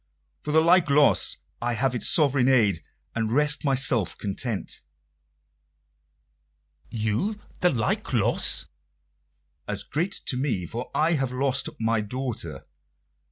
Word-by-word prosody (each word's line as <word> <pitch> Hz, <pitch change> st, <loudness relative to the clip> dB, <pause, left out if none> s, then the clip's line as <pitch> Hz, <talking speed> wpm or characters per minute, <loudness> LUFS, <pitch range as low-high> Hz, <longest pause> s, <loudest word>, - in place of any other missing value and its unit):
"For 150 Hz, -, -4 dB
the 160 Hz, +1 st, +5 dB
like 170 Hz, -1 st, +4 dB
loss 145 Hz, +1 st, +4 dB, 0.2 s
I 120 Hz, 0 st, -1 dB
have 125 Hz, +3 st, 0 dB
its 120 Hz, -, +1 dB
sovereign 140 Hz, -5 st, +3 dB
aid, 105 Hz, -10 st, +3 dB, 0.3 s
and 110 Hz, -1 st, -2 dB
rest 150 Hz, +3 st, +1 dB
myself 130 Hz, -, +1 dB
content." 105 Hz, +1 st, -4 dB, 2.1 s
"You 115 Hz, -, -2 dB, 0.2 s
the 180 Hz, -, +4 dB
like 115 Hz, -8 st, -1 dB
loss?" -, -, +3 dB, 1.0 s
"As -, -, -3 dB
great 175 Hz, +6 st, -2 dB
to 125 Hz, -, -1 dB
me; 125 Hz, -10 st, -1 dB
for 120 Hz, +8 st, -6 dB
I 160 Hz, +2 st, +2 dB
have 135 Hz, -5 st, -1 dB
lost 135 Hz, +1 st, 0 dB
my 115 Hz, 0 st, +1 dB
daughter." 125 Hz, +2 st, -5 dB
130 Hz, 120 wpm, -25 LUFS, 115-150 Hz, 2.1 s, the